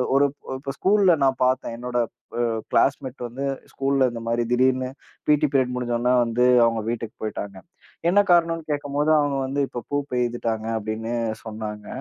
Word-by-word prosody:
ஒருப் 140 0 +3 0.2
இப்ப 135 0 -5
ஸ்கூல்ல 195 -2 +4
நான் 135 -1 +1
பார்த்தேன். 130 -2 0
என்னோட 125 +1 -4 0.4
அ - - +2 0.3
க்ளாஸ்மேட் 135 -1 +1
வந்து 130 +4 -5 0.3
ஸ்கூல்ல 135 0 +1
இந்த 115 -1 -6
மாதிரி 115 +1 +1
திடீர்னு 130 +1 +2 0.4
பீ.டி 150 0 +4
பீரியட் 130 -2 +2
முடிஞ்சோன 125 0 0
வந்து 120 +1 +1 0.2
அவங்க 115 -1 +1
வீட்டுக்குப் 115 -1 -5
போயிட்டாங்க. 100 -2 -5 0.5
என்ன 195 +4 +4
காரணம்னு 165 -1 +3
கேக்கும்போது, 145 0 -1
அவங்க 145 -1 +1
வந்து 135 +2 -2
இப்ப 120 - -6
பூப்பெயிதிட்டாங்க 120 -5 -1
அப்டின்னு 110 +2 -4 0.3
சொன்னாங்க. 105 -1 -6
125 Hz, 145 wpm, -24 LUFS, 115-140 Hz, 0.5 s, ஸ்கூல்ல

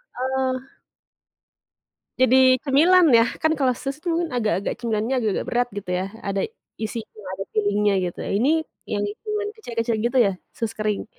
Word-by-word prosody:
heeh. 260 +1 -2 1.4
Jadi 255 0 +5
cemilan 330 +6 +5
ya, 230 0 +7 0.2
kan 315 0 +3
kalau 260 -3 +2
sus 275 +3 -4
itu 355 - -4
kan 345 -1 -1
agak-agak 215 -4 0
cemilannya 230 +1 -1
agak-agak 215 -4 -1
berat 245 0 +1
gitu 200 -3 -5
ya, 185 - -1 0.2
ada 195 0 0 0.4
isinya 220 -2 -6
ada 195 - -4
filling-nya 205 0 +2 0.2
gitu, - - -19
ini 220 +7 +1 0.4
yang 205 -1 0 0.2
cuman 420 -1 -2
kecil-kecil 235 - -2
gitu 240 +3 0
ya, 195 - +1 0.2
sus 225 -1 -2
kering? 215 -2 -1
235 Hz, 150 wpm, -23 LUFS, 215-265 Hz, 1.4 s, ya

